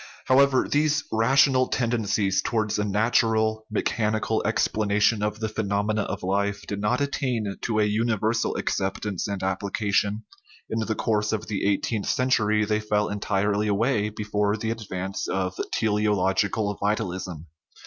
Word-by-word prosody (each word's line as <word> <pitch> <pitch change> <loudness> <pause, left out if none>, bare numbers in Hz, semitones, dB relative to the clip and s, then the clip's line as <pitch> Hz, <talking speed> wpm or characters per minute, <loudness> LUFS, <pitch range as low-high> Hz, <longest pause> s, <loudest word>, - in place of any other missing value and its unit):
However, 135 0 +4
these 150 0 +1
rational 130 +3 +4
ten 120 -2 -1
dencies 100 -4 +1
towards 110 -2 0
a - - +1
natural, 110 +1 +1
mechanical 110 0 0
explanation 105 -1 +1
of 105 +1 -2
the 110 - -1
phenomena 105 0 -1
of - - -4
life 100 +2 -1
did 100 0 -4
not 105 +6 +1
attain 125 -7 -1
to 110 -2 0
a - - +4
universal 110 +1 0
ac - - -1
1 95 0 0
ceptance 105 -3 -3
and 100 -2 -4
application; 100 +2 0 0.5
in 110 - 0
the 110 0 -1
course 105 -1 0
of 110 -1 -2
the 105 -3 -2
eigh 100 - +2
teenth 110 -4 -3
century 110 -4 +2
they 105 +1 0
fell 105 -1 0
entirely 105 0 0
away 105 +1 +1
before 105 0 -1
the 110 +1 -2
advance 95 -4 -4
of 95 -1 -1 0.2
teleological 105 -1 +1
vitalism. 95 -5 -2
105 Hz, 150 wpm, -25 LUFS, 100-110 Hz, 0.5 s, However